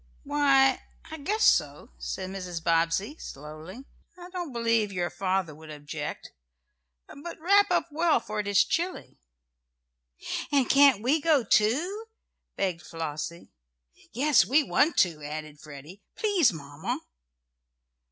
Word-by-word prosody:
"Why, 275 -2 +3 0.3
I 315 - -6
guess 420 +10 -1
so," - - +2
said 185 0 -5
Mrs. 180 -4 -6
Bobbsey, 165 - +1
slowly. 155 - -10 0.3
"I 355 0 -11
don't 350 -5 -5
believe 230 -3 +1
your 175 -2 -2
father 185 -2 -1
would 155 +1 -14
object. 150 0 -7 0.8
But 335 +4 -9
wrap 400 +5 +4
up - - +1
well, 325 +2 +2
for 215 0 -5
it 205 - -3
is 200 -1 +4
chilly." 355 +3 -3 1.3
"And 275 -3 +3
can't 275 -6 +5
we 290 +6 +2
go, 300 -4 +3
too?" 305 - +1 0.5
begged 185 -4 -2
Flossie 165 +1 -6 0.6
"Yes, 275 +1 +4
we 275 - +3
want 305 +3 +2
to," 160 -4 -9
added 150 0 -7
Freddie. 150 +7 -12
"Please, 390 - +3
Mamma!" 145 -1 -5
210 Hz, 125 wpm, -27 LUFS, -, 1.3 s, can't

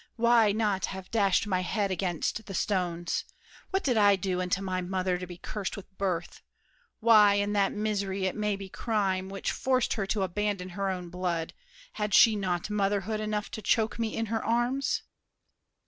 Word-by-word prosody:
Why 235 -2 +4
not 205 -3 0
have 190 -1 -8
dashed 200 -3 +3
My 190 -3 0
head 195 +2 -1
against 185 +3 -2
the 195 - -5
stones? 175 -3 -1 0.5
What 385 +1 0
did 250 -5 +1
I 205 -1 +6
do 185 -1 -2
Unto 180 +1 0
my 185 -1 -2
mother 185 0 -1
to 180 - -6
be 175 -1 -9
cursed 205 +2 -5
with 195 -1 -11
birth? 180 -3 -2 0.6
Why, 215 -3 +7
in 205 0 0
that 200 -1 +2
misery, 200 -2 -1
it 190 - -1
may 210 -1 0
be 195 0 -7
crime, 190 -3 -1
Which 195 0 -3
forced 255 -1 +1
her 195 -3 -2
to 200 -1 0
abandon 195 0 -2
her 195 +2 -2
own 180 -2 -4
blood, 175 -2 -2 0.4
Had 210 -2 -1
she 225 -2 +7
not 185 -1 -2
motherhood 205 +1 0
enough 215 -1 -2
to 220 - -6
choke 220 +3 +1
Me 225 -1 -1
in 225 - 0
her 225 - -1
arms? 240 +4 0
200 Hz, 180 wpm, -28 LUFS, 185-215 Hz, 0.6 s, Why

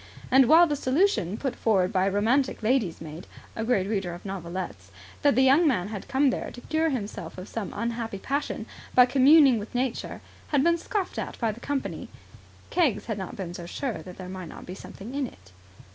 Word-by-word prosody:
And 265 -1 +6
while 330 +5 +8
the 300 -3 -1
solution 260 - +1
put 270 0 -3
forward 190 -5 +1
by 190 +1 +2
a - - +1
romantic 230 +6 +1
lady's 220 -7 +1
maid, 160 +2 -8 0.3
a 225 - -2
great 225 -5 +2
reader 195 -4 -2
of 175 - -13
novelettes, 170 - -5 0.3
that 285 -4 +4
the 260 - +5
young 280 +6 +5
man 205 -9 +1
had 210 -3 -6
come 270 0 +3
there - - -3
to 245 - -11
cure 315 +3 0
himself 205 - -5
of 185 +2 -7
some 220 -4 -5
unhappy 230 -1 -3
passion 280 +8 -3 0.3
by 250 - +8
communing 270 0 +6
with 210 +4 -9
nature, 250 -1 -2 0.3
had 285 -3 +2
been 340 +1 +3
scoffed 390 +1 -3
at - - -5
by 230 -3 0
the 220 - -10
company, 280 +2 -3 0.6
Keggs 300 - +2
had 220 -3 -3
not 190 - -6
been 180 -3 -5
so 175 -1 -7
sure 225 - -4
that 180 +2 -11
there 185 - -7
might 185 -2 -7
not - - -10
be 180 - -7
something 200 +4 -10
in 280 -2 -1
it. 95 - -17
230 Hz, 205 wpm, -26 LUFS, 190-270 Hz, 0.6 s, while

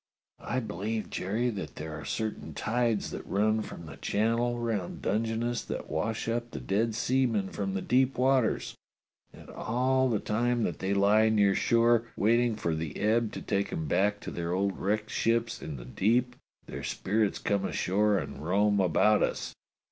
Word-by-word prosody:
"I 130 - -1
believe, 110 0 -4
Jerry, 110 +7 -1
that 100 -4 -6
there 80 0 -6
are 80 - -7
certain 110 -1 -4
tides 115 -1 0
that - - -6
run 110 +2 +1
from 85 - -8
the - - -10
Channel 115 +3 0
round 115 -6 -3
Dungeness 115 +3 0
that - - -5
wash 105 +10 -2
up 120 +1 -1
the 70 - -6
dead 105 - 0
seamen 115 -5 +1
from 95 -1 -3
the 95 - -2
deep 130 +1 +2
waters, 130 -2 +2 0.6
and - - -14
all 130 +3 +1
the 110 - +2
time 120 +3 0
that 85 -7 -2
they 95 +1 0
lie 105 +3 +4
near 100 -3 +4
shore 115 +2 +3
waiting 115 +2 +3
for 85 -6 -1
the 80 -1 -4
ebb 110 +1 +2
to - - -6
take 100 -1 -1
'em 80 -1 -3
back 105 +6 +2
to - - -6
their 85 0 -3
old 100 +1 0
wrecked 105 +2 -1
ships 115 0 0
in 75 -3 -6
the - - -9
deep 120 - +1 0.3
their - - -7
spirits 105 +1 0
come 100 -1 0
ashore 100 +2 +1
and 90 - -5
roam 100 +4 +2
about 100 +4 +4
us. - - -1
110 Hz, 175 wpm, -29 LUFS, 100-115 Hz, 0.6 s, lie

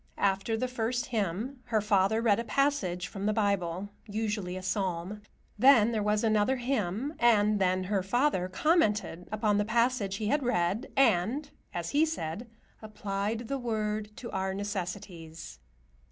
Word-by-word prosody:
After 200 +3 +1
the 255 - -1
first 240 0 -2
hymn 225 +4 -2
her 230 -3 +1
father 210 +1 +2
read 220 -2 +3
a - - -1
passage 215 -8 0
from 200 0 -4
the 215 - +2
Bible, 200 -3 0 0.2
usually 210 -3 -2
a 185 - -7
Psalm. 190 0 -2 0.4
Then 240 -3 +6
there 220 -2 0
was 210 +1 +1
another 220 +3 +3
hymn, 245 - -2
and 215 -3 +4
then 185 0 +2
her 195 +1 0
father 195 -1 +1
commented 210 - +1
upon 210 -1 +1
the - - +3
passage 230 -2 +1
he 215 - -3
had 285 +8 +1
read 220 -1 0
and, 260 - +2 0.2
as 170 -1 -4
he 295 +2 +4
said, 230 - -3 0.3
"applied 215 +1 -3
the 275 +2 -2
Word 215 -3 -2
to 235 - -7
our 190 0 -2
necessities." 180 -5 -6
210 Hz, 155 wpm, -29 LUFS, 190-235 Hz, 0.4 s, Then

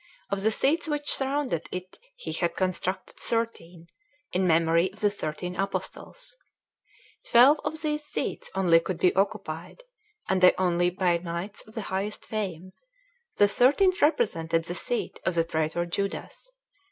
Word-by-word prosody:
Of 200 -1 0
the 215 - +3
seats 315 +9 +2
which 295 -1 0
surrounded 270 - -1
it 185 0 -7 0.2
he - - -6
had 170 - -1
constructed 185 0 -2
thirteen, 180 -8 -2 0.5
in 185 0 +2
memory 165 +2 +3
of 210 - -11
the 205 -1 +3
thirteen 180 -1 -4
Apostles. - - -4 0.9
Twelve 265 +6 +7
of 315 0 -3
these 300 -1 -1
seats 295 - -4
only 175 -4 +5
could 170 +1 -4
be 180 +1 +3
occupied, 185 - -2 0.4
and 190 -1 +1
they 180 - +7
only 175 -1 +2
by 180 -1 +1
knights 175 +4 -5
of 215 - -13
the 225 - -2
highest 200 +2 -2
fame; 185 -4 -4 0.7
the 205 - +6
thirteenth 290 - +3
represented 165 - +2
the 175 - -4
seat 240 +6 -2
of 185 - 0
the 165 - +3
traitor 160 +1 -1
Judas. 200 - -4
190 Hz, 150 wpm, -27 LUFS, 170-235 Hz, 0.9 s, Twelve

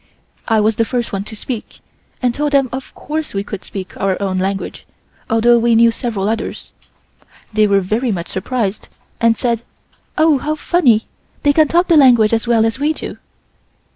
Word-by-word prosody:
I 225 -2 +3
was 215 0 +1
the 230 - +3
first 240 0 -3
one 195 0 -3
to 220 - -8
speak, 225 +1 -6 0.4
and 245 -1 +2
told 295 +2 -2
them 275 -2 +3
of 260 0 -6
course 310 -5 -5
we 195 - -1
could 205 -1 -7
speak 190 -2 -7
our 195 -1 0
own 190 -2 -1
language, 195 +1 -3 0.4
although 235 +1 +4
we 235 0 +3
knew 230 +1 +5
several 220 -5 -3
others. 225 +1 -3 0.8
They 215 0 +3
were 200 -1 +3
very 220 +6 -1
much 175 -3 -4
surprised 210 0 -3 0.3
and 230 -1 +3
said: 235 -3 0 0.6
"Oh! 310 -3 +4
how 305 +4 -2
funny, 275 -9 +2 0.4
they 290 - +4
can 310 0 +4
talk 345 +4 +2
the 335 - +5
language 240 -6 +5
as 225 +1 0
well 230 -2 +3
as 225 +3 -1
we 300 +2 +1
do." - - -8
230 Hz, 185 wpm, -17 LUFS, 210-265 Hz, 0.8 s, knew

